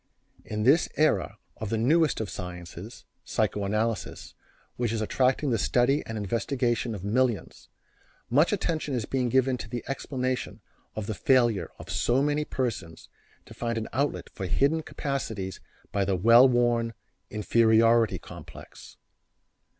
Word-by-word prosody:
In 105 0 -3
this 140 +9 +4
era 155 0 +2 0.2
of 110 - -5
the 115 - 0
newest 155 +7 +3
of 110 - -2
sciences, 90 +3 -8 0.2
psychoanalysis, 105 +1 -2 0.4
which 120 -2 -1
is 115 - -1
attracting 130 +5 +1
the 115 - +1
study 125 +7 +2
and 115 - -4
investigation 115 +2 -1
of 95 - -8
millions, 115 +1 -1 0.6
much 145 +8 +3
attention 160 -8 -1
is 115 -4 -2
being 125 0 -1
given 130 +1 +2
to 115 - -8
the 120 +1 -4
explanation 130 -2 -3 0.4
of 110 - -4
the 110 - -3
failure 120 0 +2
of 85 +4 -9
so 120 +9 +2
many 150 +1 +1
persons 110 - -4 0.4
to - - -12
find 115 -1 -3
an 110 - -4
outlet 140 +4 -1
for 95 -3 -4
hidden 140 - +2
capacities 115 -11 -4 0.3
by 100 - +1
the 95 0 0
well 115 +7 +7
worn 120 -2 +1 0.3
"inferiority 115 +1 +3
complex." - - -12
115 Hz, 140 wpm, -27 LUFS, 105-130 Hz, 0.6 s, well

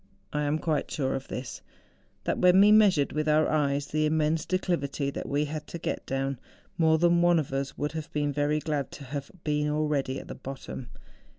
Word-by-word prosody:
I 150 - 0
am 145 +2 +1
quite 155 -2 -1
sure 135 -3 -1
of 135 - -4
this,—that 125 -1 -7
when 180 +1 +6
we 205 +1 +7
measured 200 -9 +5
with 155 0 -1
our 155 +1 +4
eyes 145 -2 +1
the 155 +1 0
immense 155 +1 +1
de¬ 185 - +2
clivity 140 -6 -2
that - - -5
we 145 +2 +1
had 150 0 -6
to - - -6
get 165 - -4
down, 135 -1 -2 0.4
more 160 -1 +4
than 170 +1 +4
one 175 0 +5
of 150 -4 -2
us 135 0 -3
would 150 - -2
have 160 +1 -6
been 145 -2 -1
very 145 +1 +1
glad 150 -3 -2
to 145 - -9
have 140 +1 -5
been 150 0 0
already 150 -3 0
at - - -11
the - - -6
bottom. 130 -2 -8
150 Hz, 205 wpm, -28 LUFS, 140-160 Hz, 0.4 s, we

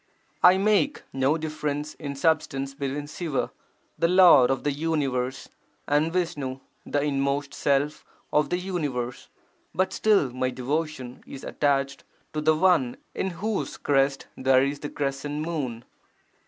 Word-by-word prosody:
1 185 +2 +6
make 205 -7 +2
no 135 +4 +2
difference 150 -1 -3
in 140 -2 -6
substance 140 -2 0
between 140 +1 -3
Siva, 150 -2 -3 0.5
the 165 - +4
Lord 175 -8 +7
of 135 - 0
the 145 - +1
universe 135 -4 -1 0.4
and 150 +3 +2
Visnu, 145 -7 -2 0.3
the 145 -1 0
inmost 140 0 -1
Self 140 +1 0 0.3
of 150 0 +3
the 180 - +1
universe. 145 -10 -3 0.5
But 185 +3 +1
still 200 - +3
my 130 +1 -1
devotion 130 0 -3
is 135 - -9
(attached) 140 -1 0 0.3
to 155 - -1
the 155 +1 +4
One 155 -8 +3 0.2
in 190 - -1
whose 205 +4 -3
crest 135 -1 +1
there 130 0 +4
is 140 +1 -1
the 145 - -5
crescent 145 +1 -3
moon. 130 -9 -3
145 Hz, 140 wpm, -26 LUFS, 135-160 Hz, 0.5 s, Lord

